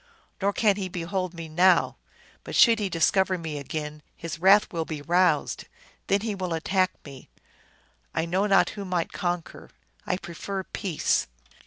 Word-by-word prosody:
Nor 200 +1 +2
can 205 -1 +2
he 190 -2 -3
behold 180 +1 -3
me 165 -1 -7
now; 175 +3 +3 0.5
but - - -6
should 230 -2 +6
he 205 -2 -1
discover 185 +2 +2
me 160 -3 -5
again, 150 +1 -5
his 165 -1 -6
wrath 195 +3 +5
will 165 -1 -1
be 155 -2 -6
roused. 175 -1 +2 0.4
Then 200 0 +2
he 220 -1 -2
will 185 -4 -3
attack 185 +3 +1
me; 135 -3 -12 0.9
I 160 - +1
know 185 +4 +1
not 195 -1 +4
who 200 - -6
might 180 -3 -2
conquer. 175 -3 -4 0.4
I 180 - 0
prefer 190 +2 -5
peace." 185 -4 -1
180 Hz, 160 wpm, -26 LUFS, 165-195 Hz, 0.9 s, should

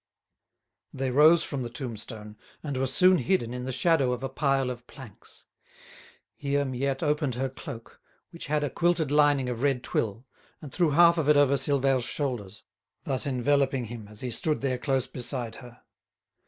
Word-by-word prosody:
They 130 -1 -3
rose 155 +5 +6
from 140 -3 -4
the 120 - -4
tombstone, 110 -3 -7 0.3
and 145 -3 -4
were 130 +1 0
soon 180 +8 +4
hidden 125 -3 0
in 125 0 -5
the 130 - -3
shadow 135 -1 +2
of 125 +1 -6
a 135 - -2
pile 135 -2 0
of 120 -1 -10
planks. 130 -8 -14 0.9
Here 140 0 -1
Miette 135 +2 -2
opened 150 -4 0
her 135 +2 -2
cloak, 115 -3 -10 0.3
which 170 - -9
had 150 +1 0
a 145 - -2
quilted 170 -4 +1
lining 145 -3 +3
of 125 -1 -4
red 135 -3 +1
twill, 115 +3 -2 0.3
and 145 -4 -10
threw 175 -2 +2
half 170 +3 +5
of 150 -2 0
it 150 - +6
over 145 -1 +4
Silvère's 135 -2 +1
shoulders, 125 -8 -4 0.4
thus 135 0 0
enveloping 135 0 +1
him 115 -2 -9
as 105 0 -9
he 125 - -4
stood 150 +6 -1
there 130 -2 -1
close 135 -1 0
beside 125 -2 -3
her. 125 -1 -14
135 Hz, 175 wpm, -27 LUFS, 125-145 Hz, 0.9 s, rose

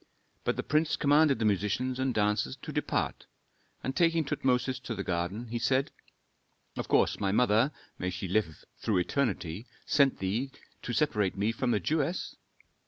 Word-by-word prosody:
But - - 0
the - - -3
prince 155 +1 +2
commanded 145 -1 +4
the 110 - -1
musicians 105 +6 0
and 130 0 +1
dancers 105 - +1
to - - -5
depart, - - -2 0.6
and 130 - -2
taking 165 -2 +3
Tutmosis 130 -3 0
to 120 -2 -5
the 100 - -3
garden, 95 +7 -2
he 120 +1 -2
said, 130 +3 +1 0.8
"Of - - -4
course - - +3
my 95 - +1
mother 115 +4 +3 0.3
may 90 - -1
she 95 +1 -4
live 90 -4 -1
through 110 -4 +1
eternity! 100 - -1 0.2
sent 140 -2 +3
thee 105 +8 -1 0.3
to - - -4
separate 105 -10 +1
me 105 +3 +1
from 120 +2 -1
the 110 - +2
Jewess? 155 - -1
120 Hz, 165 wpm, -30 LUFS, 100-135 Hz, 0.8 s, commanded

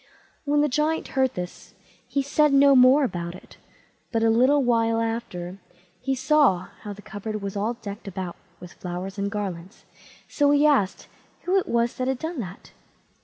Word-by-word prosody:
When 290 0 +2
the 295 - +3
Giant 300 +4 0
heard 265 -2 +1
that, 180 0 -7 0.3
he 280 - -1
said 295 +1 +2
no 275 0 +6
more 260 +3 +6
about 175 -7 -3
it; - - -15 0.5
but 225 -2 0
a 225 - +4
little 265 +5 +4
while 230 -2 +2
after, 200 -6 -4 0.4
he 270 +1 -1
saw 265 - +3
how 210 - -7
the 205 0 -10
cupboard 215 +1 -5
was 200 0 -4
all 215 +4 -1
decked 210 -2 -9
about 185 -2 -5 0.2
with 180 -1 -11
flowers 180 +2 -6
and 200 0 -1
garlands; 195 -2 -6 0.4
so 290 -1 +2
he 290 +1 +4
asked 270 -11 +2 0.4
who 365 +2 0
it - - -5
was 235 0 +1
that 255 - -1
had 265 -1 0
done 320 +2 -5
that? 190 -4 -8
230 Hz, 175 wpm, -25 LUFS, 195-275 Hz, 0.5 s, no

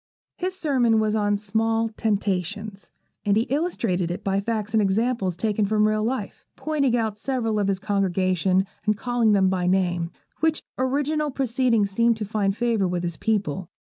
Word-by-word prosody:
His 370 +1 -3
sermon 255 -9 +2
was 215 0 +1
on 205 -1 +1
'Small 225 +2 0
Temptations,' 205 -2 -2 0.3
and 205 0 +2
he 225 - +3
illustrated 230 - 0
it 175 - -4
by 195 0 +1
facts 215 0 -3
and 220 - +4
examples 200 -2 0
taken 210 +2 0
from 215 0 +3
real 215 0 +1
life, 255 +4 -4
pointing 280 -6 0
out 220 -2 -2
several 225 -4 -1
of 200 - +1
his 195 -1 +1
congregation, 190 -1 +1 0.2
and 210 -1 +2
calling 240 -2 +2
them 195 -2 +4
by 185 -1 0
name, 175 -2 +1 0.3
which 320 -1 +1 0.2
original 290 +3 0
proceeding 250 -4 +1
seemed 230 +3 +2
to 215 - -3
find 200 -1 -1
favour 230 -5 +1
with 180 -1 -2
his 170 -2 -3
people. 190 -5 -1
215 Hz, 170 wpm, -24 LUFS, 195-235 Hz, 0.3 s, and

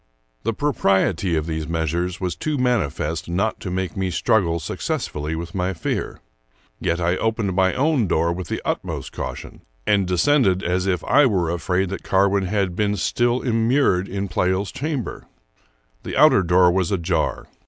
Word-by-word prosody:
The 115 - -1
propriety 95 - +1
of 80 -1 -1
these 80 -1 -3
measures 85 +2 -2
was 90 -2 -2
too 155 -1 -2
manifest 85 - -1
not 100 +6 -1
to 95 - -5
make 90 -2 -3
me 95 -1 -1
struggle 85 -1 +1
successfully 75 0 -3
with 85 +1 -6
my 95 0 -1
fears. - - -3 0.6
Yet 85 +1 -1
I 90 +1 +1
opened 110 -4 -1
my 95 -1 +2
own 140 -5 +2
door 85 0 +1
with 90 +1 -6
the - - -4
utmost - - -3
caution, - - -7 0.2
and 100 -3 +2
de 90 - 0
scended 100 - +3
as 90 +2 0
if 90 -2 0
I 145 - +5
v/ere 95 -9 +1
afraid 90 +2 0
that 95 - -5
Carwin 100 0 +2
had 95 -2 -1
been 105 +1 +1
still 120 +3 +1
im 115 -3 +1
mured 115 -8 +2
in 100 +1 -3
Pleyel's 95 +1 0
chamber. 140 -5 -4 0.7
The - - -5
outer - - +6
door 90 0 +4
was 95 0 0
ajar. 85 -3 -1
95 Hz, 170 wpm, -22 LUFS, 85-105 Hz, 0.7 s, outer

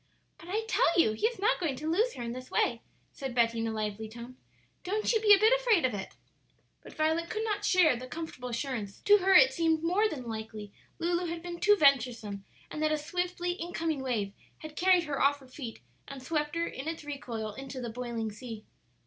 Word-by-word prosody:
"But 335 - -12
I 430 +4 -1
tell 345 -5 +2
you 220 - +5
he 425 - +1
is 475 - -5
not 425 +5 +2
going 320 -7 -1
to 300 +4 -6
lose 430 +10 +2
her 245 - -5
in 235 - -4
this 255 +1 -8
way," 235 -1 +1 0.3
said 265 -3 -6
Betty 230 -1 +2
in 225 - -1
a - - -2
lively 215 0 -3
tone; 235 +3 -10 0.5
"don't 425 +6 0
you 445 - +2
be 425 -1 +4
a 405 - +10
bit 435 +4 +5
afraid 475 - +3
of 255 - 0
it." 195 -2 -6 0.7
But - - -13
Violet 320 +2 0
could 435 0 -2
not 415 -2 -2
share 360 -8 +4
the 255 +2 -7
comfortable 255 -4 -6
assurance; 235 -5 -4
to 415 0 +6
her 385 0 +4
it 265 -5 +7
seemed 325 +1 +1
more 390 +6 +2
than 280 -8 -6
likely 220 -2 -6 0.3
Lulu 345 +1 0
had 335 0 -5
been 345 -1 -6
too 415 +3 +5
venturesome, 240 - +2 0.3
and 305 - -5
that 310 0 +2
a 310 - +2
swiftly 355 +3 -2
incoming 330 -4 -3
wave 220 -7 -2 0.2
had 310 -1 -10
carried 365 0 +4
her 295 -3 -3
off 285 +1 +4
her 270 -2 -17
feet 255 -3 -8 0.3
and 275 -2 -8
swept 300 +1 -1
her 335 0 0
in 275 -2 -6
its 325 -1 -4
recoil 240 -7 -5
into 270 +3 -7
the 240 -2 -4
boiling 235 -2 -4
sea. 215 0 -9
295 Hz, 220 wpm, -30 LUFS, 235-350 Hz, 0.7 s, a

